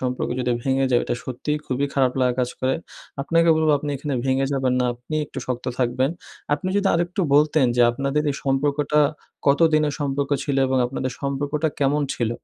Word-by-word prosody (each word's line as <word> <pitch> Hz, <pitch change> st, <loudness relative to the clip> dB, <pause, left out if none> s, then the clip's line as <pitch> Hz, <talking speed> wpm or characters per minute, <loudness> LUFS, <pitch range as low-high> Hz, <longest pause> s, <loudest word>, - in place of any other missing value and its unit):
সম্পর্ক 125 Hz, -1 st, -2 dB
যদি 125 Hz, -, 0 dB
ভেঙে 135 Hz, 0 st, +1 dB
যায়, 120 Hz, -, +4 dB
ওইটা -, -, -2 dB
সত্যিই 150 Hz, +4 st, -3 dB
খুবই 135 Hz, +2 st, 0 dB
খারাপ 130 Hz, -2 st, +2 dB
লাগা 125 Hz, -1 st, +2 dB
কাজ 125 Hz, -, 0 dB
করে।" 130 Hz, +1 st, +1 dB, 0.5 s
আপনাকে 165 Hz, +3 st, +2 dB
বলব, 160 Hz, 0 st, +2 dB
"আপনি 145 Hz, 0 st, -4 dB
এখানে 140 Hz, 0 st, -3 dB
ভেঙে 135 Hz, 0 st, +1 dB
যাবেন 130 Hz, -2 st, +1 dB
না, -, -, +2 dB
আপনি 125 Hz, +6 st, -8 dB
একটু -, -, -8 dB
শক্ত 125 Hz, -1 st, -3 dB
থাকবেন।" 130 Hz, +2 st, +1 dB, 0.4 s
আপনি 155 Hz, +5 st, -4 dB
যদি 200 Hz, -1 st, +1 dB
আরেকটু 175 Hz, +3 st, -1 dB
বলতেন, 150 Hz, -1 st, +4 dB
যে 120 Hz, -, +5 dB
আপনাদের 140 Hz, +4 st, -1 dB
এই 140 Hz, -, -3 dB
সম্পর্কটা 145 Hz, +2 st, +1 dB, 0.5 s
কত 140 Hz, +2 st, +4 dB
দিনের 150 Hz, -1 st, +2 dB
সম্পর্ক 140 Hz, 0 st, -1 dB
ছিল? 140 Hz, -2 st, -1 dB
এবং 130 Hz, 0 st, +1 dB
আপনাদের 130 Hz, 0 st, -3 dB
সম্পর্কটা 145 Hz, +3 st, -1 dB
কেমন 145 Hz, +1 st, +2 dB
ছিল? 115 Hz, -2 st, -1 dB
140 Hz, 190 wpm, -23 LUFS, 130-150 Hz, 0.5 s, যে